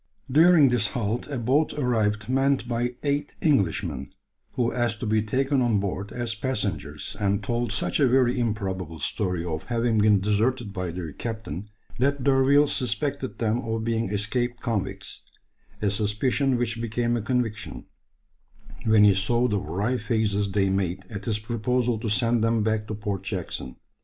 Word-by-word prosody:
During 160 Hz, -1 st, +6 dB
this 120 Hz, -4 st, +2 dB
halt 115 Hz, +1 st, -2 dB
a 140 Hz, -2 st, -4 dB
boat 130 Hz, +6 st, +1 dB
arrived 110 Hz, -6 st, 0 dB
manned 135 Hz, 0 st, +1 dB
by 120 Hz, +1 st, -1 dB
eight 145 Hz, 0 st, -1 dB
Englishmen, 105 Hz, -, +1 dB, 0.5 s
who 120 Hz, -2 st, +1 dB
asked 120 Hz, -2 st, 0 dB
to -, -, -2 dB
be 110 Hz, 0 st, +2 dB
taken 135 Hz, +5 st, +1 dB
on 120 Hz, -4 st, +2 dB
board 100 Hz, +1 st, -3 dB
as 120 Hz, -2 st, -2 dB
passengers, 105 Hz, -, -3 dB
and 100 Hz, 0 st, 0 dB
told 120 Hz, +1 st, -1 dB
such 115 Hz, -, 0 dB
a 140 Hz, -, +5 dB
very 125 Hz, 0 st, +3 dB
improbable 95 Hz, -7 st, -2 dB
story 90 Hz, +3 st, -2 dB
of 80 Hz, -2 st, -4 dB
having 115 Hz, -2 st, +1 dB
been 105 Hz, -1 st, +5 dB
deserted 105 Hz, +2 st, 0 dB
by 90 Hz, -3 st, -3 dB
their 85 Hz, -3 st, -5 dB
captain, 110 Hz, -4 st, -5 dB, 0.3 s
that 140 Hz, +1 st, +1 dB
D'Urville 140 Hz, +2 st, +5 dB
suspected 130 Hz, 0 st, -2 dB
them 115 Hz, 0 st, 0 dB
of 115 Hz, -1 st, -3 dB
being 115 Hz, -2 st, 0 dB
escaped 120 Hz, +4 st, -1 dB
convicts; 110 Hz, -5 st, -3 dB, 0.6 s
a 100 Hz, -, +2 dB
suspicion 120 Hz, +6 st, +1 dB
which 115 Hz, -1 st, -1 dB
became 120 Hz, +1 st, 0 dB
a 120 Hz, -, -1 dB
conviction, 115 Hz, -1 st, -2 dB, 1.0 s
when 110 Hz, -1 st, +5 dB
he 105 Hz, -1 st, +7 dB
saw 120 Hz, +6 st, +2 dB
the 105 Hz, -4 st, 0 dB
wry 100 Hz, +10 st, -1 dB
faces 105 Hz, -3 st, 0 dB
they 95 Hz, 0 st, +1 dB
made 95 Hz, -1 st, -1 dB
at 100 Hz, -1 st, -6 dB
his 110 Hz, -2 st, +1 dB
proposal 115 Hz, +1 st, -1 dB
to 115 Hz, 0 st, -3 dB
send 115 Hz, +1 st, +2 dB
them 115 Hz, -1 st, +2 dB
back 110 Hz, 0 st, 0 dB
to 110 Hz, -, -4 dB
Port 100 Hz, -2 st, -3 dB
Jackson. 95 Hz, -3 st, -4 dB
115 Hz, 160 wpm, -25 LUFS, 105-125 Hz, 1.0 s, he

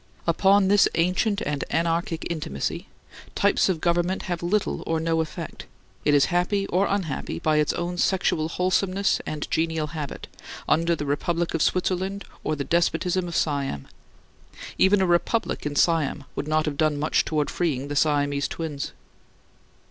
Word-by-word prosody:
Upon 195 Hz, +3 st, +4 dB
this 205 Hz, 0 st, +5 dB
ancient 185 Hz, +5 st, +1 dB
and 145 Hz, -1 st, -2 dB
anarchic 165 Hz, +2 st, -1 dB
intimacy, 150 Hz, -, -3 dB, 0.5 s
types -, -, +3 dB
of 180 Hz, -4 st, 0 dB
government 175 Hz, +3 st, 0 dB
have 175 Hz, -2 st, -3 dB
little 190 Hz, +4 st, 0 dB
or 165 Hz, 0 st, +1 dB
no 165 Hz, 0 st, +1 dB
effect; 160 Hz, -, -7 dB, 0.4 s
it 145 Hz, -, +4 dB
is 140 Hz, -, +5 dB
happy 195 Hz, +3 st, +1 dB
or 195 Hz, +1 st, +1 dB
unhappy, 165 Hz, -, -2 dB
by 155 Hz, -, +1 dB
its 150 Hz, -1 st, +2 dB
own 175 Hz, +1 st, -3 dB
sexual 165 Hz, -5 st, +1 dB
wholesomeness 185 Hz, +2 st, +1 dB
and 150 Hz, -1 st, -4 dB
genial 160 Hz, -1 st, 0 dB
habit, 150 Hz, -3 st, -5 dB, 0.4 s
under 170 Hz, +1 st, +2 dB
the 150 Hz, -, -4 dB
republic 165 Hz, +4 st, -1 dB
of 165 Hz, -, 0 dB
Switzerland 190 Hz, +2 st, 0 dB, 0.2 s
or 155 Hz, -, 0 dB
the 140 Hz, -, -3 dB
despotism 175 Hz, +3 st, +1 dB
of 170 Hz, -, -5 dB
Siam. 140 Hz, -, -1 dB, 0.9 s
Even 195 Hz, +1 st, +5 dB
a -, -, +3 dB
republic 175 Hz, +1 st, 0 dB
in 145 Hz, -, -4 dB
Siam 155 Hz, -3 st, +2 dB
would 145 Hz, -, -3 dB
not 155 Hz, 0 st, +1 dB
have 150 Hz, -2 st, -3 dB
done 155 Hz, -1 st, +2 dB
much 150 Hz, +2 st, +1 dB
towards 150 Hz, -2 st, -1 dB
freeing 145 Hz, -6 st, -1 dB
the 145 Hz, -, -4 dB
Siamese 145 Hz, -1 st, +1 dB
Twins. 155 Hz, -4 st, -5 dB
165 Hz, 155 wpm, -25 LUFS, 150-180 Hz, 0.9 s, this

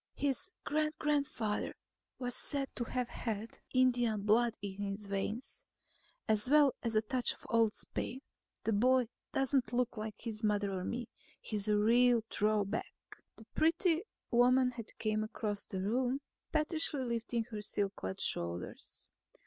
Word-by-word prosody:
"His 275 Hz, -3 st, -1 dB
great 305 Hz, +1 st, 0 dB
grandfather 280 Hz, -8 st, 0 dB, 0.4 s
was 245 Hz, -1 st, -1 dB
said 275 Hz, +1 st, +2 dB
to 240 Hz, -, -2 dB
have 250 Hz, +1 st, -1 dB
had 225 Hz, -1 st, -4 dB
Indian 245 Hz, -5 st, +3 dB
blood 225 Hz, +2 st, +3 dB
in 200 Hz, -1 st, -5 dB
his 200 Hz, +1 st, -3 dB
veins, 200 Hz, +5 st, -3 dB, 0.6 s
as 215 Hz, +2 st, +2 dB
well 290 Hz, -2 st, +6 dB
as 230 Hz, -2 st, -1 dB
a 215 Hz, -, +4 dB
touch 250 Hz, +2 st, +1 dB
of -, -, -14 dB
old 225 Hz, -2 st, +4 dB
Spain. 260 Hz, -, -4 dB, 0.4 s
The 225 Hz, -, +1 dB
boy 250 Hz, +2 st, +4 dB, 0.2 s
doesn't 270 Hz, -3 st, +1 dB
look 245 Hz, -1 st, 0 dB
like 215 Hz, 0 st, -4 dB
his 225 Hz, -1 st, -6 dB
mother 205 Hz, -1 st, +1 dB
or 185 Hz, -1 st, -2 dB
me. 235 Hz, +4 st, -3 dB, 0.3 s
He's 210 Hz, -2 st, -2 dB
a 210 Hz, -1 st, +3 dB
real 235 Hz, +2 st, +5 dB
throw 210 Hz, -1 st, +2 dB
back." 205 Hz, +3 st, -4 dB, 0.4 s
The 220 Hz, -, -14 dB
pretty 330 Hz, +1 st, +3 dB, 0.3 s
woman 250 Hz, +1 st, +5 dB
had 230 Hz, -3 st, -7 dB
come 215 Hz, -1 st, 0 dB
across 210 Hz, -1 st, -3 dB
the 190 Hz, -, -3 dB
room, 250 Hz, +5 st, +1 dB, 0.3 s
pettishly 310 Hz, -2 st, +1 dB
lifting 235 Hz, -1 st, -1 dB
her 210 Hz, -1 st, -4 dB
silk 200 Hz, -1 st, -1 dB
clad 95 Hz, 0 st, -4 dB
shoulders. 85 Hz, +1 st, -2 dB
230 Hz, 150 wpm, -34 LUFS, 210-255 Hz, 0.6 s, well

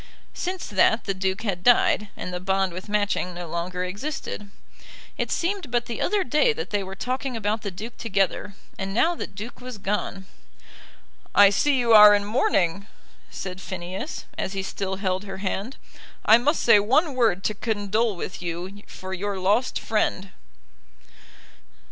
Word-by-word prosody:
Since 365 Hz, +1 st, -4 dB
that 215 Hz, +3 st, +3 dB
the 195 Hz, -, -1 dB
Duke 190 Hz, +2 st, -2 dB
had 195 Hz, -5 st, -2 dB
died, 225 Hz, -2 st, +4 dB
and 180 Hz, -, -5 dB
the 180 Hz, -, -2 dB
bond 190 Hz, 0 st, 0 dB
with 185 Hz, +4 st, -8 dB
Matching 205 Hz, -3 st, 0 dB
no 175 Hz, -1 st, -6 dB
longer 175 Hz, +2 st, -3 dB
existed. 210 Hz, +1 st, -5 dB, 0.7 s
It -, -, -2 dB
seemed 360 Hz, -3 st, -1 dB
but 240 Hz, 0 st, 0 dB
the 235 Hz, -, -5 dB
other 405 Hz, +1 st, +2 dB
day 300 Hz, -, +3 dB
that 465 Hz, +1 st, -6 dB
they 205 Hz, -1 st, +1 dB
were 190 Hz, 0 st, -6 dB
talking 255 Hz, +3 st, -3 dB
about 215 Hz, 0 st, -1 dB
the 205 Hz, -, -3 dB
Duke 215 Hz, +6 st, -8 dB
together, 200 Hz, -2 st, -1 dB, 0.2 s
and 195 Hz, 0 st, -3 dB
now 330 Hz, +9 st, +3 dB
the -, -, -5 dB
Duke 220 Hz, +5 st, -9 dB
was 250 Hz, -2 st, -7 dB
gone. 195 Hz, -1 st, -3 dB, 1.1 s
"I 200 Hz, -1 st, +8 dB
see 280 Hz, +7 st, +2 dB
you 235 Hz, -2 st, +3 dB
are 210 Hz, -1 st, +10 dB
in 205 Hz, 0 st, 0 dB
mourning," 200 Hz, -4 st, +1 dB, 0.4 s
said 185 Hz, -1 st, -6 dB
Phineas, 185 Hz, -, -6 dB
as 190 Hz, -, -2 dB
he 195 Hz, -1 st, -3 dB
still 190 Hz, 0 st, -3 dB
held 190 Hz, -1 st, -1 dB
her 195 Hz, -1 st, -6 dB
hand. 200 Hz, +5 st, -3 dB, 0.5 s
"I 225 Hz, +2 st, +7 dB
must 295 Hz, +6 st, +1 dB
say 230 Hz, -3 st, +7 dB
one 270 Hz, -, +2 dB
word 225 Hz, -7 st, +2 dB
to 215 Hz, -, 0 dB
condole 215 Hz, 0 st, 0 dB
with 180 Hz, +1 st, -6 dB
you 180 Hz, +4 st, -5 dB
for 190 Hz, 0 st, -8 dB
your 200 Hz, +1 st, -3 dB
lost 205 Hz, +7 st, +1 dB
friend." 200 Hz, -3 st, -1 dB
205 Hz, 165 wpm, -25 LUFS, 190-235 Hz, 1.1 s, are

